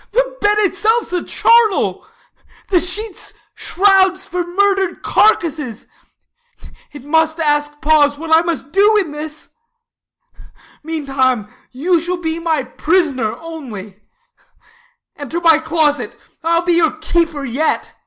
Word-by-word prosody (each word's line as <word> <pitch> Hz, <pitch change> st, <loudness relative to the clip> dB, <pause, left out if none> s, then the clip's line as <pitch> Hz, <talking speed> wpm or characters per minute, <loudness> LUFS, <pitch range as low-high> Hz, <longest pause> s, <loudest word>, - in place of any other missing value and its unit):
Ah. -, -, -32 dB
The -, -, 0 dB
bed 415 Hz, 0 st, +3 dB
itself 435 Hz, +4 st, +1 dB
's -, -, -9 dB
a 355 Hz, -, 0 dB
charnel, 460 Hz, -3 st, +2 dB, 0.6 s
the 365 Hz, -, +4 dB
sheets 380 Hz, +4 st, -4 dB, 0.2 s
shrouds 380 Hz, -1 st, +2 dB
For 360 Hz, -1 st, -3 dB
murdered 385 Hz, 0 st, 0 dB
carcasses; 310 Hz, -, +1 dB, 1.1 s
it 290 Hz, -, -11 dB
must 320 Hz, +2 st, +1 dB
ask 295 Hz, -1 st, 0 dB
pause 295 Hz, -2 st, +3 dB
What 320 Hz, +1 st, -2 dB
I 320 Hz, -, +6 dB
must 330 Hz, -5 st, -4 dB
do 415 Hz, +4 st, +4 dB
in 370 Hz, -7 st, -1 dB
this, 305 Hz, +1 st, -8 dB, 1.3 s
meantime 270 Hz, -8 st, -1 dB, 0.2 s
you 335 Hz, +7 st, 0 dB
shall 350 Hz, +3 st, -2 dB
85 -, -, -13 dB
Be 320 Hz, 0 st, -2 dB
my 320 Hz, -4 st, 0 dB
prisoner 265 Hz, -5 st, 0 dB
only: 230 Hz, -, -9 dB, 1.1 s
enter 295 Hz, +4 st, -5 dB
my 325 Hz, -2 st, +5 dB
closet; 315 Hz, -2 st, 0 dB
Exit -, -, -29 dB
Beatrice. -, -, -33 dB
I'll 335 Hz, +1 st, +2 dB
be 350 Hz, 0 st, +2 dB
your 335 Hz, -2 st, +3 dB
keeper 315 Hz, -2 st, -1 dB
yet. 275 Hz, +6 st, -2 dB
325 Hz, 135 wpm, -17 LUFS, 295-365 Hz, 1.3 s, I